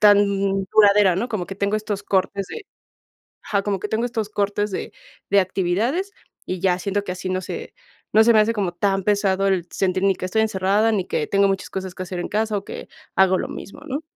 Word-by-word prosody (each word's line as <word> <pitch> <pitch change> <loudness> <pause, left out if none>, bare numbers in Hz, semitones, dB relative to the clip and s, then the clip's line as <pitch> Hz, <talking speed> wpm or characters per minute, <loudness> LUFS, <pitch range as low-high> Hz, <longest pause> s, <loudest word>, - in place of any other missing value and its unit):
tan 205 -1 +6 0.5
duradera, 205 -3 +6
¿no? 235 +6 -1
Como 215 -6 -2
que 195 - -6
tengo 200 +2 0
estos 210 -2 -3
cortes 195 0 0
de 455 - -7 0.8
ajá. 200 -1 0
Como 200 -2 -2
que 210 - -3
tengo 220 +2 0
estos 225 -3 -3
cortes 205 0 -1
de - - -4 0.4
de 200 - +6
actividades, 200 - -1 0.3
y 185 -1 -3
ya 180 -1 +2
siento 200 +2 -1
que 180 - -3
así 185 +1 -5
no 185 0 0
se - - -7 0.4
no 220 +1 +6
se 235 - +6
me 220 - +5
hace 215 +2 +3
como 195 -5 -1
tan 195 +2 0
pesado 195 -1 +2
el 185 -3 0
sentir, 185 -1 0
ni 195 -1 +4
que - - -6
estoy 200 +4 +1
encerrada, 210 +1 +2
ni 200 -4 0
que 150 - -1
tengo 200 0 +3
muchas 195 -1 -2
cosas 190 -1 -5
que 185 - -5
hacer 180 -1 -5
en - - -4
casa, 215 0 0
o 200 - -4
que - - -8 0.3
hago 190 -1 +5
lo - - -3
mismo, - - -9
¿no? 285 +1 -3
200 Hz, 225 wpm, -22 LUFS, 190-210 Hz, 0.8 s, tan